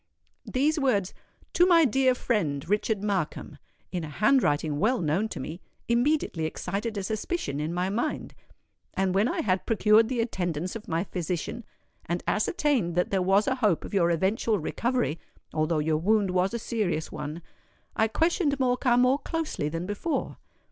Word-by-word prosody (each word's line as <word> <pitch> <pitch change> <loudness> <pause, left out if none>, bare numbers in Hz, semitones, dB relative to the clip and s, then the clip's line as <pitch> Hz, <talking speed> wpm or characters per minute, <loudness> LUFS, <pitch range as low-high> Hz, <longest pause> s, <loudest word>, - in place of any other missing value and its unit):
These 300 +5 +2
words, 210 -9 +1 0.4
'To 355 - +5
my 335 -3 +6
dear 260 0 +3
friend, 155 - -1
Richard 210 +1 0
Markham,' 195 -6 -2 0.3
in 175 -2 -3
a 155 - -5
handwriting 155 - +2
well 240 +7 +2
known 175 +7 0
to 165 - -6
me, 155 +7 -6 0.3
immediately 235 - +1
excited 205 +7 -4
a 200 - -2
suspicion 215 - -3
in 155 +2 -2
my 180 +2 -1
mind; 240 +9 -2 0.6
and 190 -1 +1
when 200 +4 +3
I - - -1
had 185 -3 0
procured 220 0 +4
the 255 -2 -1
attendance 180 -6 -2
of 225 - -8
my 165 +1 0
physician 180 +5 -4 0.4
and 175 +1 -2
ascertained 230 - +1
that 180 - +1
there 195 -1 +2
was 195 +3 +3
a 260 -1 0
hope 205 -7 +2
of - - -9
your 175 -4 +3
eventual 200 +6 +1
recovery—although 165 - -2
your 155 +1 +1
wound 200 +3 +2
was 185 +4 +1
a - - +1
serious 210 -9 -2
one—I 165 +7 -5
questioned 320 - +1
Morcar 250 -1 +2
more 255 +3 +4
closely 320 - -3
than 165 +3 -4
before. 205 - -3
205 Hz, 160 wpm, -27 LUFS, 170-245 Hz, 0.6 s, my